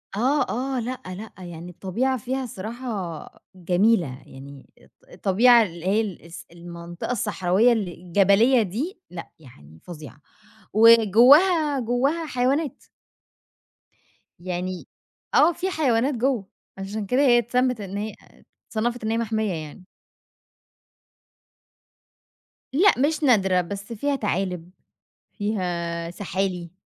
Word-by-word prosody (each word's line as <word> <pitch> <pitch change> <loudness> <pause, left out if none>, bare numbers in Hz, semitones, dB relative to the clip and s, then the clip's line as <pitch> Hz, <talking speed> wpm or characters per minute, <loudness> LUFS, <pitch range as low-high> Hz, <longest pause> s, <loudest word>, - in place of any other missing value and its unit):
آه، 270 +7 +1
آه، 260 +2 -2
لأ، 250 +2 -4
لأ 190 +4 -8
يعني 175 +1 -9
الطبيعة 235 +9 -2
فيها 260 +3 -3
الصراحة 215 - -6
جميلة، 185 0 +2 0.2
يعني 135 0 -13
الط - - -24 0.2
الطبيعة 235 - +4
اللي 170 -3 -7
هي 200 -4 -1
الص 170 +1 -11
المنطقة 170 +2 -8
الصحراوية 210 0 +2
الجبلية 200 +5 +2
دي 255 - -4
لأ، 175 -2 -9
يعني 80 - -17
فظيعة 150 -5 -10 0.5
وجواها 255 - +6
جواها 265 +8 0
حيوانات. 270 +1 0 1.6
يعني 180 +1 -5 0.5
آه، 320 +4 +6
في 375 +3 -3
حيوانات 270 -5 +1
جوّه، 240 -4 -1 0.3
عشان 200 +2 -5
كده 250 +7 +1
هي 245 -4 +5
اتسمّت 250 0 0
إن 195 0 -6
هيّ 210 +1 -4 0.6
اتصنّفت 235 +2 -2
إن 220 - -1
هي 225 - 0
محميّة 220 -3 -1
يعني. 160 +3 -8 2.9
لأ، 385 +8 +5
مش 305 +2 0
نادرة 190 -8 +3
بس 200 +5 -7
فيها 285 +6 -1
تعالِب، 180 -6 -3 0.7
فيها 175 -5 -3
سحالي 180 -2 -3
215 Hz, 110 wpm, -24 LUFS, 180-250 Hz, 2.9 s, وجواها